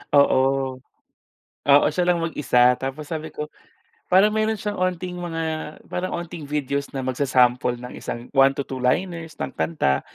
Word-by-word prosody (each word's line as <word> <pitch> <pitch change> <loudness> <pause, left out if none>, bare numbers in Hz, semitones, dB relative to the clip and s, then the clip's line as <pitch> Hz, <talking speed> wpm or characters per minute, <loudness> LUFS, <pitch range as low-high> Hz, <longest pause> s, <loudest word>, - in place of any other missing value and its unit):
Oo. 140 -2 +5 1.2
Oo, 145 0 +6
siya 180 +4 0
lang 170 - 0
mag-isa 125 -6 +3
tapos 135 +3 -5
sabi 160 -1 -5
ko 150 0 -5 0.6
parang 195 +3 +5
meron 220 0 +1
siyang 205 -1 -4
onting 180 0 -2
mga, 165 -2 -3 0.5
parang 185 +1 -3
onting 170 -4 -7
videos 140 -1 -2
na 135 - -2
magsa-sample 125 -2 +2
ng 125 +1 -9
isang 120 0 -5
1-2 135 -1 +2
liners 165 +4 -1
ng - - -4
kanta, 70 - 0
150 Hz, 140 wpm, -23 LUFS, 130-175 Hz, 1.2 s, Oo